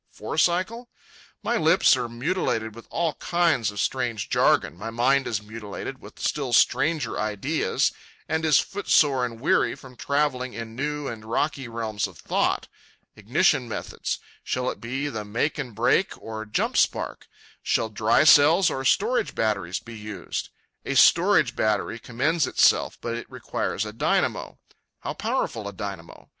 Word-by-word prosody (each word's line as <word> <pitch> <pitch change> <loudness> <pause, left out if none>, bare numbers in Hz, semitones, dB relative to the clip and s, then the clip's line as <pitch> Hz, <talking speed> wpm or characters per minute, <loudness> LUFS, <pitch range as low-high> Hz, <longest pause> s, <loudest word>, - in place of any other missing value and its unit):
four - - -6
cycle? 200 +8 +1 0.5
My - - +1
lips 165 -1 +5
are 125 -2 -3
mutilated 120 - -1
with 115 +1 -13
all 165 -2 0
kinds 170 -10 +1
of 105 -1 -7
strange 120 -5 -1
jargon, - - +3
my 100 +6 -6
mind 130 +4 +2
is 105 -3 -2
mutilated 110 +4 -7
with - - -13
still 135 -5 -2
stranger 155 +5 +2
ideas 110 +9 0 0.4
and 160 +1 -1
is 155 -3 +5
foot 200 0 -5
sore 135 -4 +4
and 115 -1 -10
weary 130 - +2
from 130 -2 -14
travelling 135 -2 -1
in 115 -1 -7
new 150 +2 -3
and 110 -2 -6
rocky 135 +4 -1
realms 110 -3 -3
of 90 -5 -15
thought.—Ignition - - -1
methods; - - -4 0.3
shall 125 0 -1
it - - -11
be 130 +5 -3 0.2
make 115 +9 -1
and 125 -6 -5
break 120 - +1
or 110 -1 -7
jump 105 - -1
spark? - - 0 0.3
Shall 110 - 0
dry 110 +5 +3
cells 155 +4 +6
or 135 - -3
storage 215 - +1
batteries 100 -5 -1
be 115 - -11
used? 105 -1 -5 0.3
A - - -3
storage - - +5
battery 110 +1 0
commends 145 +7 0
itself, - - +3
but 115 - -3
it 120 - -6
requires 100 - -3
a 105 - -7
dynamo. 115 - 0 0.4
How - - -4
powerful 110 -3 -2
a 100 - -6
dynamo? 95 -4 -8
120 Hz, 150 wpm, -25 LUFS, 110-150 Hz, 0.5 s, cells